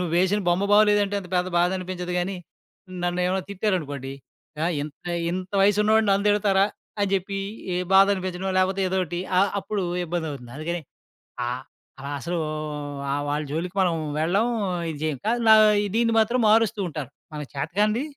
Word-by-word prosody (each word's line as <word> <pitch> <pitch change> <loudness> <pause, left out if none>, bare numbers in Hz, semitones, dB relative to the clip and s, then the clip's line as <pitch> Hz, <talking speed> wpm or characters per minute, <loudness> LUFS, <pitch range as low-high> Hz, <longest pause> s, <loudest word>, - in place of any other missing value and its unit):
నువ్వేసిన 180 +4 +1
బొమ్మ 175 +3 +2
బాలేదంటే 205 -1 +4
అంత 195 - -8
పెద్ద 180 0 +1
బాధ 175 +1 +3
అనిపించదు 180 -1 -5
గానీ, 185 +2 -2 0.7
నన్ను 175 0 0
ఏమైనా 190 +1 0
తిట్టారనుకోండి 155 - -2 0.5
ఆహ్, 170 0 0
ఇంత, 150 0 -7 0.4
ఇంత 185 +2 -4
వయసున్నవాడు 210 +2 +4
నన్ను 195 +1 +2
తిడతారా? 200 -2 +3 0.4
అని 200 -1 +1
చెప్పి 195 +1 -2 0.3
ఎహ్, 180 +1 -1
బాధనిపించడం 190 -1 +3
లేపోతే 190 +1 +1
ఏదోటి 180 -2 -1 0.2
ఆహ్, 195 +1 +4
అప్పుడు 200 0 -3 0.2
ఇబ్బందవుతుంది. 155 -8 -4
అందుకనే 170 +3 -3 0.7
ఆహ్, 125 +2 -3 0.6
అసలూ 170 +5 -3 0.9
వాళ్ళ 145 +1 0
జోలికి 175 +5 -3
మనం 175 -3 +2 0.2
వెళ్ళం. 185 +8 +2 0.4
ఇది 150 - -8
చేయం 155 -3 -1
కానీ, 235 +2 +2
నా 220 - +10
ఆహ్, 205 -1 +3
దీన్ని 230 0 +2
మాత్రం 235 +3 +2
మారుస్తూ 220 -1 +3
ఉంటారు 150 -4 -6 0.2
మనకు 150 -2 -6
చేతకానిది 205 - 0
185 Hz, 145 wpm, -24 LUFS, 170-205 Hz, 0.9 s, నా